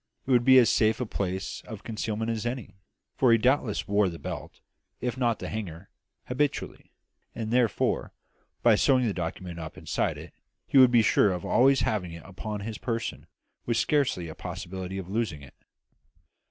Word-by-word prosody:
It 135 Hz, -, -2 dB
would 120 Hz, -2 st, +5 dB
be 130 Hz, +1 st, +7 dB
as 125 Hz, -3 st, +6 dB
safe 110 Hz, 0 st, +2 dB
a 125 Hz, -, -1 dB
place 95 Hz, -3 st, -3 dB
of 110 Hz, -3 st, -8 dB
concealment 110 Hz, 0 st, -3 dB
as 110 Hz, -2 st, -3 dB
any; 120 Hz, 0 st, -4 dB, 0.4 s
for 130 Hz, -3 st, +4 dB
he 115 Hz, -, +6 dB
doubtless 125 Hz, -2 st, +1 dB
wore 100 Hz, -1 st, +3 dB
the 85 Hz, -, -7 dB
belt, -, -, -7 dB, 0.4 s
if 125 Hz, -1 st, -2 dB
not 120 Hz, -4 st, +1 dB
the -, -, -6 dB
hanger, 95 Hz, -4 st, -6 dB, 0.4 s
habitually; 140 Hz, +3 st, -2 dB, 0.4 s
and 110 Hz, -1 st, -4 dB
therefore, 120 Hz, -3 st, +1 dB, 0.5 s
by -, -, +6 dB
sewing 130 Hz, -2 st, +3 dB
the 105 Hz, -, 0 dB
document 85 Hz, 0 st, -5 dB
up 80 Hz, -1 st, -7 dB
inside -, -, -1 dB
it, -, -, -11 dB, 0.3 s
he 135 Hz, -, +4 dB
would 130 Hz, -1 st, +8 dB
be 120 Hz, -2 st, +5 dB
sure 105 Hz, -, +4 dB
of 90 Hz, -2 st, -4 dB
always 135 Hz, +2 st, +4 dB
having 90 Hz, -6 st, -1 dB
it 85 Hz, -, -10 dB
upon 105 Hz, +2 st, -6 dB
his 110 Hz, +1 st, -5 dB
person, 115 Hz, -2 st, -4 dB, 0.4 s
with 115 Hz, -1 st, +1 dB
scarcely 135 Hz, -, +1 dB
a 80 Hz, -, -7 dB
possibility 95 Hz, +3 st, -6 dB
of 95 Hz, -2 st, -5 dB
losing 100 Hz, -8 st, -2 dB
it. 70 Hz, -, -14 dB
110 Hz, 180 wpm, -27 LUFS, 95-120 Hz, 0.5 s, would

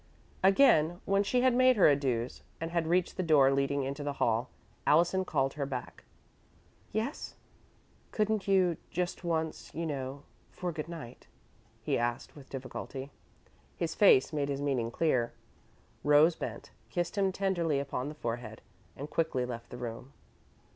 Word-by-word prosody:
Again, 180 Hz, -, +5 dB
when 195 Hz, 0 st, +3 dB
she 245 Hz, +5 st, +1 dB
had 255 Hz, -1 st, +4 dB
made 255 Hz, +1 st, +5 dB
her 205 Hz, -, +6 dB
adieux 130 Hz, -5 st, 0 dB, 0.2 s
and 165 Hz, 0 st, -4 dB
had 170 Hz, -2 st, 0 dB
reached 180 Hz, +1 st, +1 dB
the -, -, +1 dB
door 150 Hz, -6 st, +5 dB
leading 140 Hz, 0 st, +1 dB
into 140 Hz, +2 st, -4 dB
the 145 Hz, 0 st, -2 dB
hall, 115 Hz, +2 st, +1 dB, 0.4 s
Allison 175 Hz, +5 st, +4 dB
called 135 Hz, -6 st, 0 dB
her 145 Hz, -2 st, -3 dB
back. 125 Hz, -3 st, -6 dB, 0.9 s
"Yes?" 225 Hz, +8 st, -3 dB, 0.8 s
"Couldn't 215 Hz, -1 st, 0 dB
you 185 Hz, -4 st, +3 dB
just 180 Hz, +1 st, -3 dB
once, 160 Hz, -2 st, -2 dB
you 165 Hz, +1 st, -2 dB
know 140 Hz, -2 st, -4 dB, 0.3 s
for 180 Hz, -1 st, -4 dB
good 155 Hz, 0 st, -6 dB
night?" 150 Hz, -8 st, -9 dB, 0.6 s
he -, -, 0 dB
asked, 120 Hz, 0 st, -2 dB
with 140 Hz, -3 st, -13 dB
difficulty. 135 Hz, +1 st, -6 dB, 0.6 s
His 170 Hz, -1 st, -2 dB
face 160 Hz, -8 st, +5 dB
made 145 Hz, -2 st, -1 dB
his 140 Hz, -1 st, -2 dB
meaning 135 Hz, -5 st, 0 dB
clear. 125 Hz, -3 st, +1 dB, 0.7 s
Rose 150 Hz, +3 st, +5 dB
bent, -, -, -6 dB, 0.2 s
kissed 175 Hz, -1 st, -2 dB
him 195 Hz, -2 st, +2 dB
tenderly 175 Hz, -6 st, 0 dB
upon 140 Hz, -1 st, -3 dB
the 150 Hz, -, -8 dB
forehead, 115 Hz, -4 st, -5 dB, 0.3 s
and 145 Hz, -, -5 dB
quickly 150 Hz, -4 st, 0 dB
left 120 Hz, -1 st, -7 dB
the 125 Hz, -, -8 dB
room. 125 Hz, +2 st, -7 dB
150 Hz, 155 wpm, -31 LUFS, 135-175 Hz, 0.9 s, her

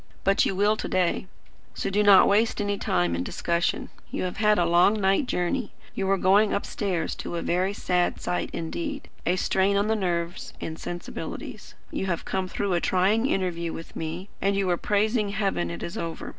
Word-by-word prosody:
But 195 Hz, +1 st, +3 dB
you 195 Hz, -, -1 dB
will 205 Hz, +3 st, +3 dB
to -, -, -3 dB
day; 185 Hz, 0 st, 0 dB, 0.5 s
so -, -, -2 dB
do 205 Hz, +2 st, +2 dB
not 205 Hz, -2 st, +7 dB
waste 220 Hz, +3 st, +2 dB
any 205 Hz, -1 st, -1 dB
time 90 Hz, -1 st, +1 dB
in 85 Hz, -, -2 dB
discussion. 170 Hz, -, -1 dB, 0.2 s
You -, -, -3 dB
have 180 Hz, -, -3 dB
had 210 Hz, -1 st, +4 dB
a 175 Hz, -, +3 dB
long 175 Hz, +5 st, +4 dB
night 195 Hz, +7 st, +2 dB
journey; 205 Hz, +6 st, -1 dB, 0.2 s
you 195 Hz, 0 st, -1 dB
are 195 Hz, -, +3 dB
going 200 Hz, +3 st, +4 dB
upstairs 190 Hz, -5 st, -2 dB
to -, -, -5 dB
a 170 Hz, -, -2 dB
very 185 Hz, +3 st, +1 dB
sad 180 Hz, -3 st, 0 dB
sight 180 Hz, -, -2 dB
indeed, 290 Hz, -, -4 dB, 0.2 s
a 180 Hz, -, +3 dB
strain 190 Hz, +2 st, +2 dB
on 205 Hz, +2 st, +1 dB
the 220 Hz, -, +3 dB
nerves 175 Hz, -4 st, -2 dB
and 160 Hz, 0 st, -5 dB
sensibilities. 175 Hz, 0 st, -7 dB, 0.2 s
You 190 Hz, -, -2 dB
have 170 Hz, -3 st, -2 dB
come 190 Hz, -1 st, -1 dB
through 195 Hz, +1 st, -2 dB
a 175 Hz, -, +1 dB
trying 200 Hz, +7 st, +2 dB
interview 170 Hz, -6 st, -1 dB
with 165 Hz, -, -9 dB
me, 165 Hz, +4 st, -4 dB
and 200 Hz, 0 st, +2 dB
you 195 Hz, -1 st, +1 dB
are -, -, +3 dB
praising 210 Hz, +3 st, +1 dB
Heaven 195 Hz, -, -1 dB
it 85 Hz, 0 st, -6 dB
is 170 Hz, -, -5 dB
over. 165 Hz, -1 st, -5 dB
190 Hz, 200 wpm, -26 LUFS, 175-205 Hz, 0.5 s, not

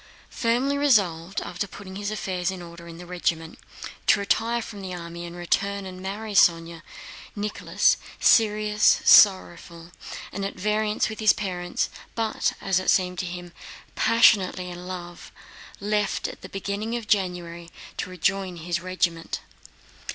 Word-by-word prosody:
Firmly 255 Hz, +5 st, 0 dB
resolved, 195 Hz, -, +2 dB
after 200 Hz, -, -4 dB
putting 190 Hz, -1 st, -10 dB
his 205 Hz, +1 st, -3 dB
affairs 190 Hz, -4 st, -2 dB
in 185 Hz, -2 st, -6 dB
order 170 Hz, 0 st, -11 dB
in 165 Hz, -1 st, -10 dB
the 175 Hz, -, -10 dB
regiment, 170 Hz, -2 st, -2 dB, 0.5 s
to -, -, +5 dB
retire 230 Hz, +4 st, +1 dB
from 205 Hz, -3 st, -9 dB
the 185 Hz, -1 st, -5 dB
army 170 Hz, 0 st, -7 dB
and 170 Hz, -, -9 dB
return 200 Hz, +3 st, -1 dB
and 185 Hz, -1 st, -8 dB
marry 205 Hz, +3 st, -5 dB
Sónya, 165 Hz, -3 st, +3 dB, 0.5 s
Nicholas, 210 Hz, 0 st, +1 dB, 0.2 s
serious, 215 Hz, -1 st, +4 dB
sorrowful, 175 Hz, -3 st, +5 dB, 0.4 s
and 200 Hz, -, -4 dB
at 195 Hz, -, -3 dB
variance 210 Hz, +2 st, 0 dB
with 220 Hz, -1 st, -7 dB
his 215 Hz, -2 st, +5 dB
parents, 180 Hz, -3 st, -2 dB, 0.3 s
but, 225 Hz, -1 st, 0 dB
as 185 Hz, -1 st, +1 dB
it 185 Hz, -, -2 dB
seemed 180 Hz, -1 st, +2 dB
to 185 Hz, -, -2 dB
him, 175 Hz, 0 st, -8 dB, 0.4 s
passionately 195 Hz, -5 st, +3 dB
in 175 Hz, +1 st, -9 dB
love, 175 Hz, -2 st, -8 dB, 0.5 s
left 210 Hz, 0 st, -1 dB
at -, -, -10 dB
the -, -, -9 dB
beginning 200 Hz, +4 st, -3 dB
of 235 Hz, -3 st, -5 dB
January 175 Hz, -4 st, -1 dB, 0.3 s
to -, -, -3 dB
rejoin 185 Hz, +1 st, -1 dB
his 170 Hz, 0 st, -3 dB
regiment. 170 Hz, -2 st, -2 dB
185 Hz, 145 wpm, -25 LUFS, 175-210 Hz, 0.5 s, to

